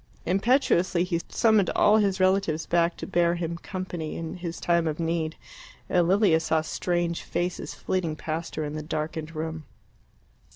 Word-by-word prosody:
Impetuously 185 -3 +2
he 175 -2 -1
summoned 220 -4 +3
all 210 +1 +5
his 200 -3 +1
relatives 185 -4 +2
back 170 0 +1
to - - -5
bear 175 -2 +2
him 170 -1 -3
company 180 -5 -5
in 165 +1 -5
his 170 -1 -5
time 170 -1 +2
of 155 0 -2
need, 165 -1 -1 0.5
and 175 -2 +2
Lilia 190 -3 +4
saw 160 0 +1
strange 175 +1 -1
faces 175 +1 -3
flitting 170 -4 -2
past 160 +2 -4
her 155 - -2
in 145 0 -4
the 155 - -4
darkened 155 +1 -4
room. 160 0 -4
170 Hz, 160 wpm, -26 LUFS, 160-185 Hz, 0.5 s, all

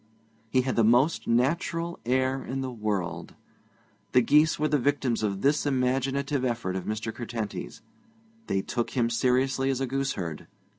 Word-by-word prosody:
He 130 +2 +3
had 130 0 -2
the 115 - +5
most 125 +8 +3
natural 165 +7 0
air 130 +1 +1
in 135 +1 -4
the 130 -1 -3
world. 105 -6 -3 0.8
The 125 - +6
geese 150 +4 +4
were 155 - +1
the 150 -1 +2
victims 135 -3 0
of 100 -2 -1
this 145 +2 +2
imaginative 135 +1 0
effort 115 -7 -1
of 95 - -4
Mr. 110 +1 -3
Curtenty's. 110 - -5 0.6
They 95 0 0
took 120 +2 -3
him 120 -1 +2
seriously 130 +2 +1
as 135 -1 0
a 135 - 0
gooseherd. 125 - -3
130 Hz, 155 wpm, -27 LUFS, 115-135 Hz, 0.8 s, The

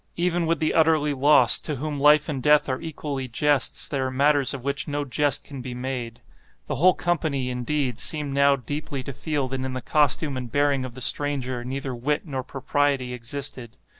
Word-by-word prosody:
Even 175 -1 0
with 165 +1 +1
the 155 - 0
utterly 155 -2 +3
lost, 145 +2 +5
to 150 - -2
whom 145 +2 -4
life 150 +1 +5
and 140 -5 -3
death 150 +2 +4
are 130 -1 -2
equally 145 -4 -5
jests, 145 +3 +1
there 135 -2 -1
are - - -2
matters 140 +1 +2
of 135 -3 -6
which 140 +3 -2
no 145 -1 -2
jest 140 +1 0
can 140 -3 -9
be 125 0 -6
made. 125 -2 -5 0.4
The - - -3
whole 180 +6 +5
company, 150 -7 -1
indeed, 125 0 -2
seemed 150 -3 -1
now 140 0 +4
deeply 140 +1 -5
to 140 - -6
feel 145 -1 -2
that 135 0 -3
in 130 -1 -4
the 130 - -3
costume 145 +1 +1
and 125 -3 -6
bearing 145 -1 +1
of 120 -2 -9
the 130 - -9
stranger 130 -3 +1
neither 130 +1 -4
wit 145 +7 -2
nor 135 -5 -4
propriety 135 -1 -1
existed. 125 0 -5
140 Hz, 195 wpm, -24 LUFS, 130-150 Hz, 0.4 s, lost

